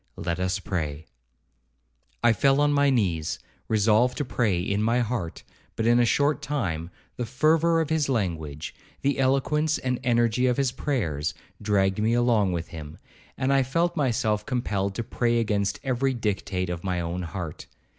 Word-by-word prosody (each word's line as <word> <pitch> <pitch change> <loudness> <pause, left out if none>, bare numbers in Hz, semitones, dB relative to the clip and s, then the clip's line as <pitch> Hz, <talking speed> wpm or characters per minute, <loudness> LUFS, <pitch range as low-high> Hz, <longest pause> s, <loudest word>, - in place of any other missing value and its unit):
—Let 85 +1 -2
us 95 +1 0
pray.' 80 -6 -4 1.2
I 120 -1 +6
fell 135 +4 +3
on 145 0 +3
my 140 0 +4
knees, 90 - 0 0.3
resolved 110 +3 +3
to 145 - -1
pray 110 -8 0
in 100 +3 -1
my 115 +3 +2
heart; 115 -8 -3 0.3
but 110 - -1
in 120 +1 +5
a 120 - +4
short 145 +4 +2
time, 90 - -2 0.3
the 120 - -2
fervour 160 +6 +3
of 160 -1 -1
his 155 -3 +1
language, 80 - -2 0.3
the 140 0 +1
eloquence 150 +4 +2
and 125 -1 -2
energy 120 0 +2
of 125 - +1
his 135 -3 +1
prayers, 90 - -2 0.3
dragged 100 -1 +1
me 110 +2 +2
along 115 -5 +3
with 85 -1 -3
him, 80 -2 -9 0.4
and 130 +1 +1
I 135 - +4
felt 165 +7 0
myself 110 -7 +1
compelled 100 -6 -2
to 115 - -2
pray 120 +1 0
against 105 -3 0
every 130 0 0
dictate 95 -5 -2
of 85 -1 -5
my 90 -2 -1
own 85 +1 -3
heart. 85 -1 -6
115 Hz, 165 wpm, -26 LUFS, 95-130 Hz, 1.2 s, I